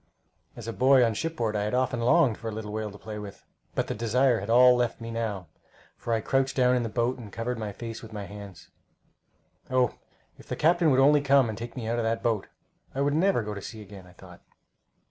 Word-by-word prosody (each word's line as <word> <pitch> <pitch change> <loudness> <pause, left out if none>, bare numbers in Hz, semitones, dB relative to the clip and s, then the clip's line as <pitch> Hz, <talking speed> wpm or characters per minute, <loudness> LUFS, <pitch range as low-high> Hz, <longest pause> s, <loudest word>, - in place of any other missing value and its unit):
As - - -9
a 115 - -3
boy 130 0 +5
on 115 - 0
shipboard 120 -5 -2
I 105 - 0
had 105 +4 -1
often 125 -1 0
longed 125 0 +3
for 115 - -6
a - - -2
little 105 -1 -6
whale 110 0 -3
to 100 - -11
play 105 0 -7
with, 100 -1 -10 0.3
but - - 0
the - - -3
desire 120 +2 +2
had 100 - -7
all 125 +2 +7
left 120 -1 -1
me 115 0 -6
now, 110 -5 -3 0.5
for 120 - -6
I 115 -1 +1
crouched 135 +3 0
down 125 -1 +3
in 125 - +1
the 115 - -3
boat 120 +3 -1
and 110 -4 -10
covered 115 +2 -3
my 105 -2 -4
face 115 +2 -7
with 115 - -11
my 105 -2 -6
hands. 100 -4 -11 1.0
Oh, 130 -2 +2 0.5
if - - -15
the - - -3
captain 170 +1 +3
would 130 -2 +3
only 145 +2 +5
come 140 -3 +4
and 110 - -4
take 115 +2 -7
me 120 -4 -5
out 120 +1 0
of - - 0
that 115 0 -1
boat! 110 -4 0 0.5
I 135 - -1
would 140 0 +1
never 175 - +2
go 105 0 -5
to 100 - -7
sea 110 +2 -8
again, 95 -2 -13
I 90 - -17
thought. 90 -2 -15
115 Hz, 240 wpm, -27 LUFS, 105-130 Hz, 1.0 s, all